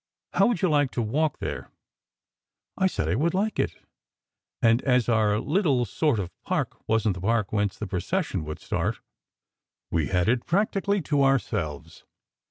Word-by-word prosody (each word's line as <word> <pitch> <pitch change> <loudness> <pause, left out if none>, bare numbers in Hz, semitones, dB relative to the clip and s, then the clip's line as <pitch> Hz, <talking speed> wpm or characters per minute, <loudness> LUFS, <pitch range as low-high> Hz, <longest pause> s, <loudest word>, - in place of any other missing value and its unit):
How - - +4
would 225 -5 -1
you - - +5
like 145 -4 +3
to 120 - -1
walk 145 +7 0
there? - - -5 0.5
" - - -65
I 190 - +2
said 80 - -2
I 80 - +1
would 160 - +1
like 210 +2 0
it, - - 0 0.8
and 115 +2 +4
as 125 -3 +2
our 110 -3 +3
"little 145 - +1
sort 145 +4 +1
of" 95 -3 -3
park - - -2
wasn 110 -2 +2
t 90 - -8
the 95 - -3
park 115 -3 +1
whence 105 -3 0
the - - -4
procession 95 - -2
would 75 0 -5
start, - - -2 0.9
we 80 -3 +1
had 90 -2 +1
it 120 +1 +1
practically 200 0 +1
to 145 -2 +1
ourselves. 105 - -1
120 Hz, 175 wpm, -26 LUFS, 100-160 Hz, 0.9 s, you